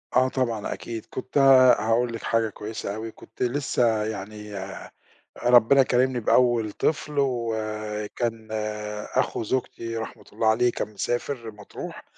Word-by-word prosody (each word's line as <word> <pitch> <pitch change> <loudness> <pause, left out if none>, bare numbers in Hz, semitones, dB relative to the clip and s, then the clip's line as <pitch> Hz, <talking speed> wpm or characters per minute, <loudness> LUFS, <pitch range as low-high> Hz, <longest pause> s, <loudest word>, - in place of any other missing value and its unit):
آه 130 +1 +5
طبعًا، 120 -5 -1
أكيد. 115 -2 -7
كنت 130 +2 -4 0.4
هاقول 115 +2 +1
لِك 115 - -6
حاجة 115 -1 +1
كويسة 105 -1 -5
أوي. 110 +1 -5
كنت - - -7
لسّه 120 -4 +1
يعني 105 0 -6
آآ 95 0 -7 0.5
ربِّنا 125 +3 +6
كارمني 130 0 +2
بأول 120 -1 +3
طفل 150 +5 -1
وكان 110 -2 -2 0.7
أخو - - +1
زوجتي 115 -1 -3
رحمة 110 - -6
الله 110 - 0
عليه 120 +2 +4
كان 105 -2 -4
مسافر 120 +2 -3
مطروح، 105 -1 -9
115 Hz, 130 wpm, -25 LUFS, 110-125 Hz, 0.7 s, ربِّنا